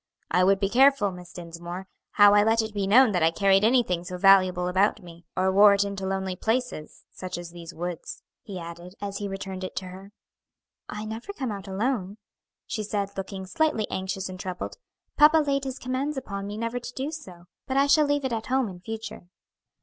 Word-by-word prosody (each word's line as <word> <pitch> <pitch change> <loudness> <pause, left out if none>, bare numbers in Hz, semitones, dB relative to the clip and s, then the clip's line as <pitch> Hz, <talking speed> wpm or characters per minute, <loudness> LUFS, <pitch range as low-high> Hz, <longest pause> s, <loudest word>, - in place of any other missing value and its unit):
"I 180 +2 +4
would 195 +1 +4
be 195 - +1
careful, 255 -2 +4
Miss 180 -1 -11
Dinsmore, 175 +2 -8 0.3
how 205 -1 +7
I 205 - +6
let 225 +1 +3
it 220 -1 -6
be 200 -2 -1
known 240 +3 +6
that 180 -3 0
I 160 - +5
carried 195 +3 +3
anything 220 -7 +2
so 180 +1 -6
valuable 185 -2 +5
about 195 +3 +1
me, 170 -1 -14
or 190 +1 +2
wore 200 +1 +7
it 200 - +2
into 200 -1 -4
lonely 190 -1 -2
places, 225 -6 -3
such 185 -1 -6
as 175 -1 -8
these 170 -1 -9
woods," 175 0 -6 0.2
he 200 -4 -8
added, 170 +2 -9
as 200 -1 -5
he 205 - -3
returned 195 -1 -6
it 185 - -6
to 185 -1 -4
her. 190 +2 -11 0.8
"I 210 +1 -5
never 225 - -6
come 260 - -3
out 200 -1 -7
alone," 200 0 -2 0.5
she 225 - -4
said, 200 -1 -3
looking 195 0 -5
slightly 230 +1 0
anxious 190 0 -3
and 185 -1 -8
troubled; 185 -1 -5 0.4
"papa 305 +1 +7
laid 280 -3 +1
his 265 0 -4
commands 265 +3 -3
upon 200 -6 -5
me 205 +1 -6
never 230 +2 -2
to 245 0 -8
do 275 +3 -3
so; 185 - -10 0.2
but 265 - -1
I 275 - +5
shall 295 +1 +4
leave 290 -1 0
it 260 - -1
at 225 -1 -3
home 260 -3 +1
in 180 -2 -10
future." 225 -2 -7
200 Hz, 210 wpm, -26 LUFS, 185-230 Hz, 0.8 s, how